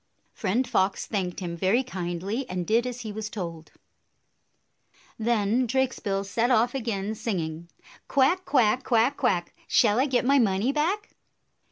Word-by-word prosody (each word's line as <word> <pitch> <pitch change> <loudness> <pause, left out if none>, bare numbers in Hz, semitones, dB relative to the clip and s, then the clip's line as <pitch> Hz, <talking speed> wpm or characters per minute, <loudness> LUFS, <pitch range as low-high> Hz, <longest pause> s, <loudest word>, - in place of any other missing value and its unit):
Friend 245 +7 0
Fox 195 -5 +1
thanked 190 -4 -3
him 170 -2 -4
very 190 +9 +2
kindly, 195 +3 -4
and 180 -1 -3
did 230 +5 +2
as 250 0 -5
he 220 -3 -5
was 215 0 -5
told. 170 -7 -6 1.5
Then 230 +2 +1
Drakesbill 230 -6 0
set 225 +5 0
off 245 0 +3
again, 220 -5 -2
singing, 170 -7 -4 0.4
"Quack, 280 +8 +3
quack! 255 -4 +2
Quack, 240 +3 +2
quack! 190 -12 0
Shall 220 0 +3
I 270 - +3
get 250 -2 +1
my 280 +2 +4
money 210 +2 +2
back?" 360 +9 -1
225 Hz, 145 wpm, -26 LUFS, 190-255 Hz, 1.5 s, my